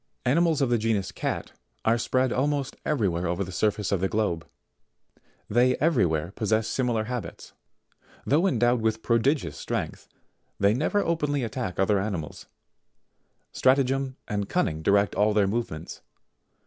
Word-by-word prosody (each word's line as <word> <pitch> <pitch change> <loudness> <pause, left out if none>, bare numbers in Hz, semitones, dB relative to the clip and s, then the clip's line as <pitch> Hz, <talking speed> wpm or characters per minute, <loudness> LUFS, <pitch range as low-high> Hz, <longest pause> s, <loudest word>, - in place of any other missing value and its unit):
71. 125 - +2
Animals 165 0 +2
of 130 - +1
the 120 - +4
genus 110 -3 0
CAT, - - -3 0.3
are 115 +1 +3
spread 130 +2 +1
almost 140 0 -1
every 130 -9 +1
where 85 0 -1
over 90 +3 -1
the 95 - -7
surface 105 +1 0
of 100 -3 +1
the 95 - +2
globe: 105 -7 -1 1.0
they 125 +3 +3
every 150 - +3
where 80 +2 -2
possess 110 +1 0
similar 120 -4 0
habits. 120 0 -6 0.7
Though 160 +7 +3
endowed 120 - +2
with 110 0 0
prodigious 115 - +1
strength, - - -4 0.5
they 100 +1 +4
never 155 - +1
openly 150 -5 0
attack 115 -5 -4
other 95 +1 +3
animals; 95 -7 -4 1.0
stratagem 135 0 +2
and 100 -2 -2
cunning 80 - 0
direct 100 +3 +3
all 105 +1 +2
their 105 -2 +4
movements. 95 -7 -4
115 Hz, 150 wpm, -26 LUFS, 100-130 Hz, 1.0 s, the